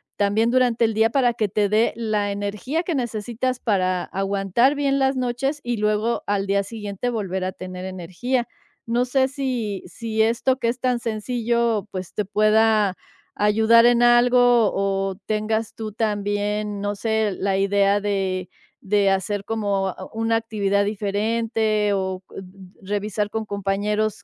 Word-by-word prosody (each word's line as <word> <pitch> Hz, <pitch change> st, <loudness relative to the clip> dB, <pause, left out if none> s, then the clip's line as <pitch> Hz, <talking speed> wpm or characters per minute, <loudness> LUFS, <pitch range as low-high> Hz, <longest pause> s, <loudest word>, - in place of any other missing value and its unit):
también 210 Hz, +3 st, +2 dB
durante 245 Hz, -2 st, +3 dB
el 225 Hz, -, 0 dB
día 220 Hz, +1 st, +3 dB
para 245 Hz, -1 st, +2 dB
que 220 Hz, -2 st, 0 dB
te 205 Hz, +2 st, +1 dB
dé 215 Hz, +3 st, +2 dB
la 215 Hz, -3 st, -1 dB
energía 205 Hz, -, -3 dB
que 340 Hz, -2 st, -2 dB
necesitas 240 Hz, +1 st, -2 dB
para 185 Hz, -6 st, 0 dB
aguantar 195 Hz, +7 st, +1 dB
bien 280 Hz, -1 st, +1 dB
las 265 Hz, 0 st, +2 dB
noches 255 Hz, +4 st, -1 dB
y 240 Hz, -1 st, -2 dB
luego, 215 Hz, +2 st, 0 dB
al 200 Hz, -1 st, 0 dB
día 200 Hz, 0 st, +1 dB
siguiente, 205 Hz, +2 st, -4 dB
volver 190 Hz, -5 st, -3 dB
a 185 Hz, -, -1 dB
tener 185 Hz, 0 st, -8 dB
energía. 190 Hz, +8 st, -3 dB, 0.4 s
No 235 Hz, +2 st, +1 dB
sé, 260 Hz, +1 st, +2 dB
si 250 Hz, -7 st, -3 dB
si 220 Hz, -2 st, -3 dB
esto 235 Hz, +4 st, +2 dB
que 235 Hz, -, 0 dB
es 240 Hz, +2 st, -3 dB
tan 250 Hz, -1 st, 0 dB
sencillo, 235 Hz, -1 st, -1 dB
pues, 185 Hz, -3 st, -6 dB
te 210 Hz, -, -1 dB
pueda 215 Hz, -1 st, +3 dB, 0.4 s
ayudar 220 Hz, +3 st, +5 dB
en 240 Hz, 0 st, +4 dB
algo 240 Hz, +1 st, +5 dB, 0.3 s
o 195 Hz, 0 st, -1 dB
tengas 215 Hz, +1 st, -1 dB
tú, 220 Hz, -1 st, -5 dB
también, 205 Hz, -1 st, -1 dB
no 205 Hz, 0 st, -2 dB
sé, 220 Hz, 0 st, 0 dB
la 195 Hz, -1 st, 0 dB
idea 200 Hz, +1 st, +2 dB
de 190 Hz, -3 st, -2 dB, 0.3 s
de 200 Hz, 0 st, +2 dB
hacer 195 Hz, +1 st, -1 dB
como 200 Hz, -3 st, -1 dB, 0.2 s
una 225 Hz, 0 st, +1 dB
actividad 200 Hz, -3 st, 0 dB
diferente, 215 Hz, +1 st, 0 dB
o 190 Hz, -1 st, -2 dB
n -, -, -8 dB
n 190 Hz, -, -10 dB, 0.3 s
n 190 Hz, -, -13 dB
revisar 210 Hz, 0 st, -1 dB
con 220 Hz, +1 st, -3 dB
compañeros 205 Hz, +1 st, -1 dB
215 Hz, 155 wpm, -22 LUFS, 200-235 Hz, 0.4 s, ayudar